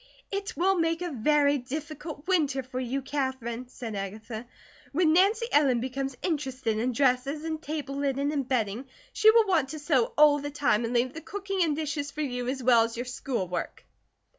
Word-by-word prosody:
"It 395 0 -4
will 380 +1 +2
make 330 +1 0
a 350 - -3
very 285 +3 +3
difficult 300 +3 -6
winter 295 -8 +1
for 255 0 -5
you, 260 +2 -2
Katherine," 260 -4 -3
said 240 -3 -7
Agatha. 215 +4 -6 0.5
"When 315 0 +3
Nancy 405 +6 +4
Ellen 275 -5 +4
becomes 265 +1 -3
interested 265 - -1
in 250 +3 0
dresses 275 +3 +1
and 315 -1 -3
table 290 -3 -4
linen 280 0 0
and 280 -4 -2
bedding 240 -1 -1 0.3
she 435 - +6
will 450 0 +6
want 330 -9 +2
to 315 - -5
sew 290 -6 +1
all 295 -1 +6
the 290 +1 -4
time, 265 -6 +1
and 230 - -3
leave 245 +2 +2
the 320 - -7
cooking 390 0 -3
and 310 -3 +1
dishes 290 -2 -3
for 300 +2 -5
you 250 -4 -2
as 260 0 -2
well 240 -2 +6
as 230 0 -4
your 245 - -3
schoolwork." 240 -7 -4
275 Hz, 190 wpm, -28 LUFS, 250-310 Hz, 0.5 s, she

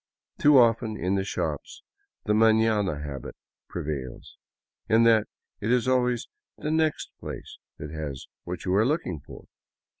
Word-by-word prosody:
Too 145 -1 +6
often, 115 -2 +3
in 90 +3 -1
the 95 -1 +1
shops, 75 -6 -4 0.4
the 105 - +2
maiiana 110 -7 +3
habit 70 -4 -7 0.3
prevails, 70 -4 -5 0.3
— - - -46
in 115 +1 +5
that 115 -2 +5 0.3
it 110 - -1
is 125 -1 +2
always 125 -2 +1 0.3
the 150 - -3
next 160 -1 0
place - - -8 0.2
that 75 0 -7
has 75 -4 -5 0.2
what 90 0 -6
you 90 - +1
are 100 +3 +4
looking 115 - -1
for. - - -12
105 Hz, 150 wpm, -26 LUFS, 80-120 Hz, 0.4 s, Too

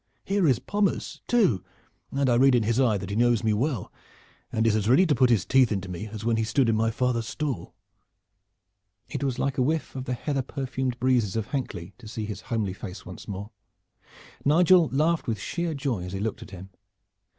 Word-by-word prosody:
Here 195 -3 +2
is 130 -5 +4
Pommers 200 -6 -1
too, 185 - +3 0.5
and 140 0 0
I 125 - +4
read 130 +2 +5
in 120 - +3
his 115 +3 +1
eye 115 -6 +3
that 100 0 -6
he - - -2
knows 120 0 +3
me 110 -1 +2
well 120 -1 -1 0.6
and 110 0 0
is 110 -2 +3
as 110 0 0
ready 160 +10 +6
to 155 - +2
put 130 -3 +4
his 115 -5 +3
teeth 130 -3 +4
into 95 -2 -2
me 90 +4 -5
as 110 0 -7
when 115 -1 +2
he 115 - +1
stood 115 +3 +2
in 115 - +3
my 115 +1 +2
father's 115 0 0
stall." 140 - -4 1.3
It - - -4
was 135 -3 -1
like 135 +1 -1
a - - +4
whiff 155 +4 -1
of 130 -1 -4
the 125 - -2
heather 140 +2 -1
perfumed 130 -1 -3
breezes 125 -6 +2
of 110 -1 -2
Hankley 100 - -4
to 115 - -11
see 110 0 -4
his 105 -2 -6
homely 110 -6 -2
face 95 -1 -8
once 90 - -10
more. 100 +2 -6 0.9
Nigel 170 +2 +5
laughed 155 +4 +1
with 115 -2 0
sheer 170 - -3
joy 135 -9 -2
as 90 +1 -6
he 95 - -3
looked 110 +1 -3
at - - -10
him. 95 0 -10
120 Hz, 215 wpm, -26 LUFS, 105-140 Hz, 1.3 s, ready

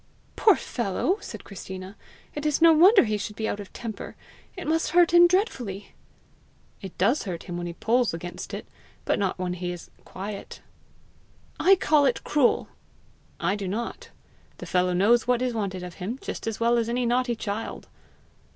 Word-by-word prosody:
"Poor 425 -4 +5
fellow!" 240 - -1
said - - -8
Christina; 190 0 -8 0.4
"it 295 - -5
is 300 -1 +1
no 330 0 +7
wonder 380 +7 +7
he 215 -3 -1
should 205 +1 -5
be 220 0 -2
out 205 - -3
of 200 - -9
temper! 225 -3 -7 0.4
It 365 - -6
must 320 +1 +1
hurt 350 -1 +6
him 345 0 +8
dreadfully!" 255 - -1 0.9
"It 190 -4 -9
does 225 +10 +2
hurt 175 -4 -5
him 175 - -6
when 175 0 -4
he 170 - -5
pulls 235 +6 +1
against 175 +1 -7
it, - - -6 0.4
but - - +1
not 195 -2 -1
when 180 -1 -2
he 180 0 -4
is 175 -1 -9
quiet." 200 +2 -7 1.0
"I 390 +2 +6
call 300 -5 +3
it 255 - +1
cruel!" 290 -5 +2 0.7
"I 195 +2 +1
do 200 -2 -4
not. 225 +5 -4 0.5
The - - -8
fellow 180 0 +1
knows 220 +7 +3
what 250 -1 +3
is 250 -1 -1
wanted 195 -5 -3
of 180 -1 -7
him 220 +8 -3
just - - -6
as 225 - -3
well 235 +1 +3
as 230 0 -1
any 245 +1 0
naughty 245 0 +1
child." 215 0 -5
220 Hz, 180 wpm, -26 LUFS, 190-260 Hz, 1.0 s, him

